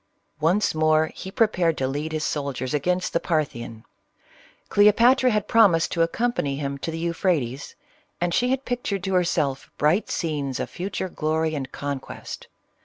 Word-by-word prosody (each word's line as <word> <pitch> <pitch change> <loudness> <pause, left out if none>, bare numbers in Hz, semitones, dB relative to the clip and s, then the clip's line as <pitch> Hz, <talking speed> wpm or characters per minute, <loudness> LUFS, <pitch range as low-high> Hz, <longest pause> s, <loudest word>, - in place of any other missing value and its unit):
Once 175 +7 +2
more 155 0 +2
he 190 - -8
prepared 185 -6 +2
to 130 - 0
lead 145 +4 -3
his 155 -1 -2
soldiers 140 -3 -2
against 180 +5 0
the 170 - +2
Parthian. 120 -10 -3 0.8
Cleopatra 235 +5 +5
had 210 -3 0
prornised 205 -9 +4
to 165 - 0
accompany 165 - 0
him 140 -1 -4
to 165 - -4
the 165 - -4
Euphrates, 165 -6 -1 0.4
and 175 0 0
she 245 +6 +2
had 265 +1 -1
pictured 220 -6 -2
to 190 0 -2
herself 165 -7 0
bright 155 +8 +2
scenes 145 -6 -2
of - - -4
future 190 +1 -3
glory 160 -1 -1
and 135 -3 -4
conquest. 140 -2 -6
165 Hz, 155 wpm, -24 LUFS, 145-190 Hz, 0.8 s, Cleopatra